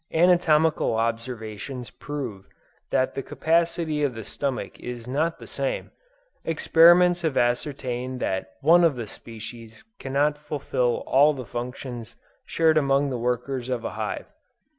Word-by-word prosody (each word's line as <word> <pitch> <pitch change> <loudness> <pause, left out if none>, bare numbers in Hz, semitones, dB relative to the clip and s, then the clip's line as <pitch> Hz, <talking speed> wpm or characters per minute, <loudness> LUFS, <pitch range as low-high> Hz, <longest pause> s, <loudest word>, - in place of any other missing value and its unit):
Anatomical 160 -5 +3
observations 115 +1 -3
prove 125 -10 -6 0.4
that 130 - +1
the - - -3
capacity 165 0 0
of 140 -5 0
the 115 - -6
stomach 135 +4 -4
is 120 -1 -7
not 155 +6 0
the - - -11
same - - -3 0.5
experiments 175 +2 +5
have 160 -5 -1
ascertained 125 0 -1
that 95 -2 -2
one 170 +4 +6
of 165 -5 +4
the 120 -2 -4
species 115 - -10
cannot 145 +2 0
fulfil 140 -5 -1
all 145 +3 +5
the 130 -2 -6
functions 120 0 -6 0.3
shared 160 -1 +3
among 140 0 +2
the 125 - -2
workers 125 +1 -2
of 120 -2 -2
a - - -2
hive. - - -4
135 Hz, 135 wpm, -25 LUFS, 120-155 Hz, 0.5 s, one